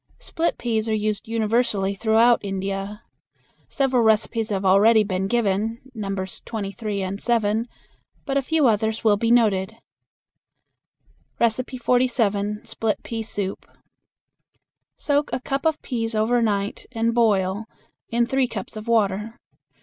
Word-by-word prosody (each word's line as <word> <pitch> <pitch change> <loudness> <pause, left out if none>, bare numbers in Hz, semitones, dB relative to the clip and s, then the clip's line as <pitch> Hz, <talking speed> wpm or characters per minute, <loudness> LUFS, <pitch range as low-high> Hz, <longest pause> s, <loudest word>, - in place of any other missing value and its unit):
Split 335 +1 -2
peas 225 -2 -1
are 220 - +1
used 215 0 -2
universally 220 -3 +1
throughout 225 +3 +4
India. 195 +2 -4 0.7
Several 265 -3 +1
recipes 220 0 +1
have 195 -2 -2
already 210 +4 +5
been 190 -1 -2
given 220 0 0
(Nos. 195 -4 -4
23 210 -2 -4
and 195 +2 -4
7), 225 -1 +1 0.6
but 275 - -2
a 275 - +3
few 310 +2 +1
others 220 -1 +1
will 215 -2 +5
be 230 +3 -1
noted. 220 -3 +2 1.6
47. 235 -3 0
Split 220 -2 -2
Pea 230 -1 -4
Soup. 205 -3 -4 1.3
Soak 290 0 0
a - - -1
cup 275 +4 -1
of 315 -1 0
peas 225 -3 -3
over 230 +3 +2
night 205 -2 -1
and 230 -1 0
boil 205 -3 +2 0.4
in 235 +1 +2
three 265 +1 +1
cups 220 -4 -7
of 215 +1 -8
water. 215 0 +1
220 Hz, 125 wpm, -23 LUFS, 200-235 Hz, 1.6 s, already